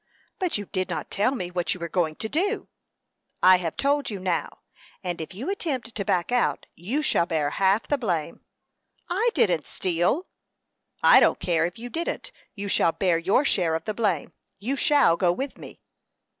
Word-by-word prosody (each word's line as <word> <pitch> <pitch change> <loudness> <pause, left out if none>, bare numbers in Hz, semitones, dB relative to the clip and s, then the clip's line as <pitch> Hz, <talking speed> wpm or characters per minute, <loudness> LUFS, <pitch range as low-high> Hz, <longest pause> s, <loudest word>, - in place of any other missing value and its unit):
"But 365 - 0
you 205 - -5
did 185 0 -3
not - - -4
tell 215 +7 +1
me 180 -7 -4
what 180 0 -1
you - - -10
were 170 - -3
going 165 -3 0
to 220 - -4
do." 375 - -1 0.8
"I 185 0 +8
have 165 -3 -4
told 285 +1 +1
you 205 - -4
now; 185 -2 -2 0.4
and 175 -2 -3
if 160 +3 -8
you 235 +8 -6
attempt 270 - -3
to 200 - -2
back 180 +2 0
out, 245 -1 +1
you 240 - -2
shall 170 - +2
bear 155 -4 0
half 195 +5 +2
the 290 - 0
blame." 170 - -2 0.7
"I 425 +7 +2
didn't 170 -6 +2
steal." 180 - 0 0.8
"I - - +8
don't - - +3
care 165 -2 +1
if 175 - -10
you 235 +2 -7
didn't; 330 +7 -4 0.2
you 200 -1 -5
shall 170 -3 +3
bear 180 -4 +1
your 200 +11 +2
share 170 -10 +1
of 160 - -4
the 215 - -2
blame. 210 -1 -1 0.2
You 250 +7 -2
shall 285 - +4
go 175 -1 +3
with 265 +10 -4
me." - - -11
195 Hz, 190 wpm, -25 LUFS, 175-260 Hz, 0.8 s, I